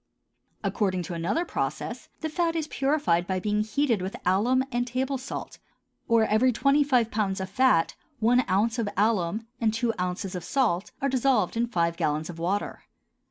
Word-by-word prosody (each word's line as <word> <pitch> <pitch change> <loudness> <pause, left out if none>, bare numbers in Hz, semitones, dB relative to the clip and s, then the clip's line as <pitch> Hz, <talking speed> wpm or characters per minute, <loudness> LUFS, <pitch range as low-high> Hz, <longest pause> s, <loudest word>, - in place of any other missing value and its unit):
According 185 -4 0
to 175 - -6
another 180 - -1
process - - -4
the 315 - -2
fat 335 +1 0
is 315 -2 -1
purified 270 - +1
by 185 -1 0
being 210 +2 0
heated 225 0 0
with 190 +2 -4
alum 225 +8 +3
and 245 0 -1
table 260 +2 -1
salt; 265 - -7 0.5
or 230 -2 +4
every 220 +5 +3
twenty 275 +4 +3
five 250 -5 +2
pounds 200 -3 -1
of 190 0 -5
fat, 250 -7 +3 0.2
one 245 +3 +3
ounce 220 +5 +1
of 220 -3 0
alum 210 0 +1
and 225 -2 +2
two 230 +1 0
ounces 180 +2 -2
of 180 -2 -5
salt 215 -9 0
are - - +3
dissolved 250 -7 +2
in 235 +1 +1
five 170 -5 0
gallons 155 0 -1
of 165 - -11
water. 190 +5 -2
220 Hz, 175 wpm, -27 LUFS, 185-255 Hz, 0.5 s, or